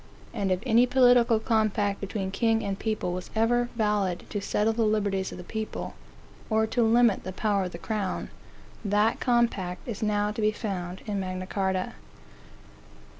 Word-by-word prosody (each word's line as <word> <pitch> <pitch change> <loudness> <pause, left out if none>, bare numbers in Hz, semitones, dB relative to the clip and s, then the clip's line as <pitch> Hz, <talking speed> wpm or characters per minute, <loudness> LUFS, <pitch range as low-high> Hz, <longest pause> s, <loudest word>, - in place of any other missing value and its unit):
And 195 -2 -1
if 185 0 +1
any 240 0 +5
political 245 -2 +5
compact 215 -3 +1
between 195 -1 -3
king 225 +2 +1
and 195 -1 -3
people 215 -5 -2
was 180 0 -5
ever 240 +2 +2
valid 210 -5 0
to 205 - -2
settle 210 +2 +1
the 230 - -1
liberties 205 -3 +1
of - - -8
the 180 - -8
people, 220 +4 -5 0.6
or 220 0 +3
to 240 +2 0
limit 230 -1 +4
the 190 - -5
power 200 0 0
of 180 - -5
the 170 - -7
crown, 200 +1 -3 0.5
that 210 +2 +2
compact 235 -7 0
is 225 -4 -5
now 210 -1 +1
to 220 - -4
be 215 0 +3
found 190 -4 -5
in 205 -2 -2
Magna 185 -1 -4
Carta. 190 -1 -1
210 Hz, 170 wpm, -27 LUFS, 190-225 Hz, 0.6 s, any